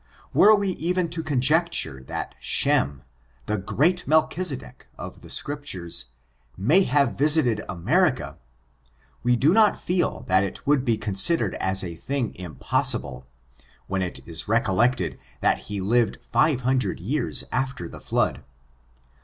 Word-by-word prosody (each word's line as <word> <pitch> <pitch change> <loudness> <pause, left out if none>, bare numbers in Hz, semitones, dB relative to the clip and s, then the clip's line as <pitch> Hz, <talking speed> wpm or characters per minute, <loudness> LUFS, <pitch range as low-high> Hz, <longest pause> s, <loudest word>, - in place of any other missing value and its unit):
Were 215 +1 +7
we 200 -1 -1
even 180 0 -1
to 165 0 -3
conjecture 150 - +1
that - - -5
Shern^ 70 +1 +1 0.4
the 105 -1 -2
great 170 - 0
Mdchisedek 155 - -1
of - - -9
the - - -13
Scriptures, 95 - -3 0.5
may 145 - +3
have 140 -1 +2
visited 140 -7 +4
America; 85 -2 0 0.8
we 125 0 +2
do 140 +8 +3
not 215 -1 +4
feel 180 0 -1
that 95 +1 +2
it 100 - -6
could 140 -2 +2
be 115 -4 +1
considered 105 - +2
as 95 0 +1
a 85 -2 -5
thing 125 - -3
impossible, 65 -5 0 0.6
when 95 0 -2
it 90 -2 -5
is 85 -1 -3
recollected 115 +2 +1 0.2
that - - +2
he 100 -1 -3
lived 110 +3 +1
five 130 +3 +1
hundred 125 -5 0
years 125 - 0
after 130 -9 -2
the - - -11
flood. - - -1
125 Hz, 135 wpm, -24 LUFS, 95-155 Hz, 0.8 s, Were